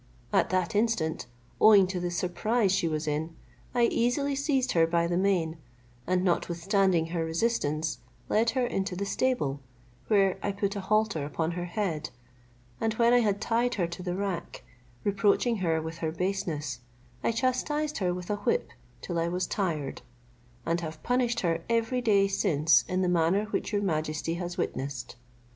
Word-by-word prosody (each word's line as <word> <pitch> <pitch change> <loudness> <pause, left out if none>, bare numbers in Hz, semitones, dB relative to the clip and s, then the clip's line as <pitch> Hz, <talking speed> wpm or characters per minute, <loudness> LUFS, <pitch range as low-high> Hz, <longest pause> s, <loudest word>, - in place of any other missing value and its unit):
At - - +3
that 185 -3 0
instant, 205 - 0 0.3
owing 205 -3 +7
to 185 0 -3
the 175 0 -2
surprise 190 +5 0
she 190 -3 +1
was 155 -1 -2
in, 155 +2 -2 0.4
I 240 - +3
easily 245 +5 +1
seized 270 -2 +1
her 165 -1 +4
by 170 0 +2
the 175 +1 -1
mane, 175 -4 +1 0.5
and 180 0 +1
notwithstanding 180 0 +1
her 165 -2 0
resistance, 160 -3 -1 0.3
led 225 +2 +2
her 255 - +3
into 195 -5 -2
the 200 +2 -2
stable, 200 - 0 0.5
where 195 -3 +3
I 200 - -1
put 200 +1 -2
a - - -2
halter 210 -5 +1
upon 160 +3 -2
her 175 +1 -4
head, 175 -5 -2 0.7
and 225 -1 0
when 235 +1 +4
I 245 - +6
had 205 -4 +1
tied 235 +3 +1
her 180 - +1
to 170 +1 -7
the 180 -1 -3
rack, 195 -2 -4 0.4
reproaching 205 +4 +2
her 165 -4 +1
with 160 +1 -6
her 160 -1 -1
baseness, 160 -7 -2 0.4
I - - +2
chastised 290 +5 -1
her 180 -3 +1
with 180 +2 -4
a 205 - 0
whip - - 0 0.3
till 170 -1 -2
I 165 - +1
was 180 +2 -1
tired, 165 -9 -2 0.6
and 170 +1 0
have 160 -1 -7
punished 245 -1 +1
her 165 -2 0
every 230 +2 +1
day 200 -4 +4
since 165 -6 +3
in 185 +1 0
the - - +1
manner 180 +4 +2
which - - -2
your 205 -1 0
majesty 155 -2 -1
has 175 0 -4
witnessed. 130 -2 -3
185 Hz, 170 wpm, -28 LUFS, 165-215 Hz, 0.7 s, owing